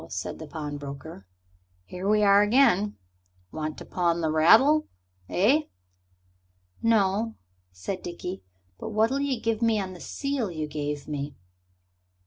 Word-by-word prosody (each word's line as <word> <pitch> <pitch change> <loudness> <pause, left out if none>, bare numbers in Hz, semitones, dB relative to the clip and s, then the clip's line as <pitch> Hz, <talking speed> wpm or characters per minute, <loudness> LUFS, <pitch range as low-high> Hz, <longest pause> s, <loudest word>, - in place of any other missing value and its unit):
said 90 +2 -5
the 160 - -8
pawnbroker, 145 - -7 0.6
"here 180 - -4
we 210 0 +4
are 200 0 +6
again. 210 -3 +3 0.5
Want 155 -1 -4
to - - -9
pawn 170 -2 0
the 160 -1 0
rattle, 230 - +5 0.4
eh?" 270 - +3 1.2
"No," 220 0 +2 0.4
said 90 - -5
Dickie, 180 +2 -6 0.4
"but - - -5
what'll 220 +5 +2
you 275 -4 -1
give 225 0 -1
me 225 -2 +3
on 190 -2 -4
the 180 - -11
seal 275 -3 -2
you 155 -3 -3
gave 150 -1 -4
me?" 145 -1 -4
190 Hz, 130 wpm, -26 LUFS, 155-225 Hz, 1.2 s, are